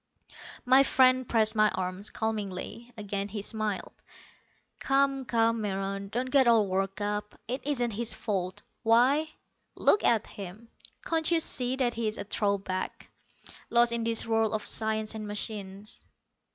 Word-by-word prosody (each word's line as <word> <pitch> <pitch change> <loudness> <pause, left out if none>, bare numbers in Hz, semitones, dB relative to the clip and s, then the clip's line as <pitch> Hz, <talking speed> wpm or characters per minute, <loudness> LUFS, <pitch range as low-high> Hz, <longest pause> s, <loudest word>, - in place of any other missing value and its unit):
My 260 +2 +6
friend 255 -2 +3
pressed 220 -2 +2
my 215 0 +4
arm, 185 0 -4
calmingly. 220 +2 -4
Again 200 -1 -3
he 205 0 -5
smiled. 215 -3 -2 0.9
"Come, 275 -1 +1
come, 230 -1 +1
Meron, 195 -1 -3
don't 250 +4 -3
get 270 -3 +4
all 225 -3 +5
worked 195 +1 -2
up. 210 0 -4
It 255 +4 -3
isn't 245 -5 0
his 230 +2 -1
fault. 185 -4 -3 0.2
Why, 255 +7 +3 0.5
look 415 - +3
at 225 -2 +3
him. 200 +4 -10 0.4
Can't 325 -1 0
you 335 -1 +3
see 255 -5 +1
that 250 -3 0
he 230 -1 -2
is 215 - -2
a - - -4
throwback, 200 -2 -3 0.6
lost 235 0 +4
in 235 -1 -1
this 230 0 +2
world 225 -1 +1
of 215 - -1
science 220 0 0
and 215 -1 -6
machines? 205 -1 -6
220 Hz, 150 wpm, -28 LUFS, 205-240 Hz, 0.9 s, My